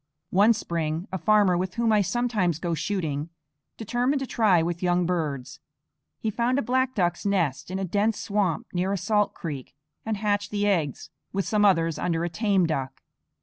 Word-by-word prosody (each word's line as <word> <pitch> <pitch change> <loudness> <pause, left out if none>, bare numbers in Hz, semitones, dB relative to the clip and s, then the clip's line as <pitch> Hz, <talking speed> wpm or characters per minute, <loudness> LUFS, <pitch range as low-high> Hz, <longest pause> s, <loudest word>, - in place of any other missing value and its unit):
One 205 +5 +5
spring 165 -4 -3
a 190 - -3
farmer, 205 +1 +4
with 185 +1 -2
whom 235 -1 +2
I 210 -1 +4
sometimes 205 -6 0
go 170 0 -2
shooting, 160 -3 -2 0.5
determined 245 +5 0
to - - -1
try 205 -9 +3
with 170 0 -3
young 175 -1 +2
birds. 155 -7 -3 0.6
He 220 - -1
found 240 +4 +1
a 280 - +1
black 260 +2 0
duck's 175 -3 0
nest 170 -10 0
in 185 - -3
a 195 - -2
dense 205 +4 0
swamp 200 -6 0
near 185 +2 0
a 200 - 0
salt 210 +3 +1
creek, 145 -6 -6 0.3
and 220 -1 -2
hatched 205 -1 0
the 205 -1 -1
eggs 165 -9 -1 0.2
with 195 0 -1
some 210 -1 +1
others 165 -5 +3
under 170 -2 0
a 175 - -1
tame 195 +1 +2
duck. 135 -4 -3
190 Hz, 185 wpm, -26 LUFS, 170-210 Hz, 0.6 s, One